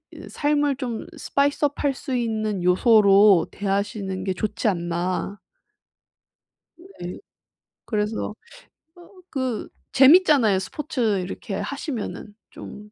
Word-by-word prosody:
이 - - -10
삶을 290 -2 0
좀 245 -5 -4
스파이스업 285 +1 0
할 285 -1 +2
수 265 0 -5
있는 215 -5 -2
요소로 200 -1 +5
대하시는 195 -1 -3
게 190 - 0
좋지 215 +5 -2
않나. 180 +2 -2 1.4
네. 335 - -9 0.7
그래서 210 0 -2 0.6
어 350 -1 -16 0.2
그 260 -5 -3 0.3
재밌잖아요 270 - +6
스포츠 230 -2 -2
이렇게 190 +2 -6
하시면은. 250 - -5 0.2
좀 210 0 -11
215 Hz, 220 characters per minute, -23 LUFS, 195-275 Hz, 1.4 s, 재밌잖아요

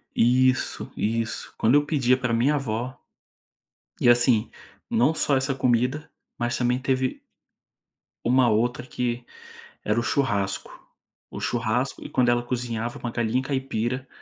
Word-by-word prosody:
Isso, 130 +2 +2
isso, 115 +1 -2
quando 115 +5 +3
eu 145 0 +4
pedia 130 -4 +2
para 125 -2 -1
minha 125 +6 +3
avó, 125 -2 -3 1.0
e - - +4
assim, 120 -2 +4 0.4
não 135 +8 +3
só 145 -3 +2
essa 130 +1 0
comida, 130 +4 0 0.3
mas 120 0 -1
também 125 0 +1
teve 130 -1 -1 1.0
uma 125 +1 +4
outra 120 +3 0
que 120 -1 -3 0.6
era 105 +2 +1
o - - -1
churrasco. 100 -9 -1 0.6
O - - -6
churrasco, 120 +3 -1
e - - -7
quando 125 -1 +2
ela 120 0 +2
cozinhava 120 -1 -3
com - - -5
a - - -3
galinha 115 +2 0
caipira 130 -2 -2
125 Hz, 140 wpm, -25 LUFS, 115-130 Hz, 1.0 s, eu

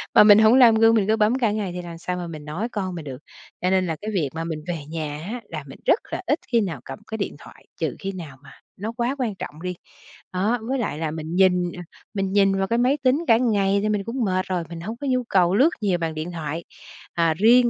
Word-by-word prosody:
mà - - +10
mình 210 0 +8
hổng 220 +2 +6
làm 240 -4 +7
gương, 225 +1 +5
mình 205 -3 +2
cứ 220 - +4
bấm 215 +2 +3
cả 230 -5 +2
ngày 205 -4 -2
thì 180 - -3
làm 170 -1 -8
sao 180 +2 -3
mà 175 -1 -4
mình 155 -3 -8
nói 175 +10 -3
con 190 -4 -3
mình 165 -3 -7
được. 135 -3 -6 0.4
Cho 180 - +1
nên 185 0 +2
là 160 - -1
cái 215 +1 -4
việc 160 -8 0
mà 165 0 -3
mình 160 -2 -4
về 165 -5 -4
nhà 155 -2 -4
á, 245 - -5
là - - -5
mình - - -11
rất - - +4
là - - -3
ít 295 - +2
khi 235 -2 +4
nào 185 -6 -3
cầm - - -7
cái 220 - -4
điện 200 - -3
thoại, - - -15
trừ - - -1
khi 195 -1 -3
nào 160 -8 -8
mà 135 - -14 0.3
nó 210 +4 -4
quá 245 +3 0
quan 230 -6 -1
trọng 155 -4 -8
đi. 180 0 -3 0.6
Đó, 205 +6 +1
với 265 +1 0
lại 205 -10 -2
là 160 -2 -2
mình 160 +1 -5
nhìn, 180 -2 +3
à, 180 - -8 0.3
mình 195 -2 -1
nhìn 195 -1 +4
vào 195 0 0
cái 230 - +1
máy 255 +4 +3
tính 275 +6 +2
cả 225 -1 +6
ngày 200 -5 +2
thì 215 - +1
mình 210 -2 0
cũng 235 +4 -2
mệt 185 -1 0
rồi, 180 -2 -1
mình 170 -1 -7
hông 220 +6 -5
có 285 - -5
nhu 255 -1 +1
cầu 185 -5 +3
lướt 270 +9 +6
nhiều 195 -4 +2
bằng 165 -2 -2
điện 160 +3 -4
thoại. 165 0 -4 0.5
Ờ, 165 -1 +3
riêng 235 +7 +5
195 Hz, 275 wpm, -23 LUFS, 170-225 Hz, 0.6 s, mà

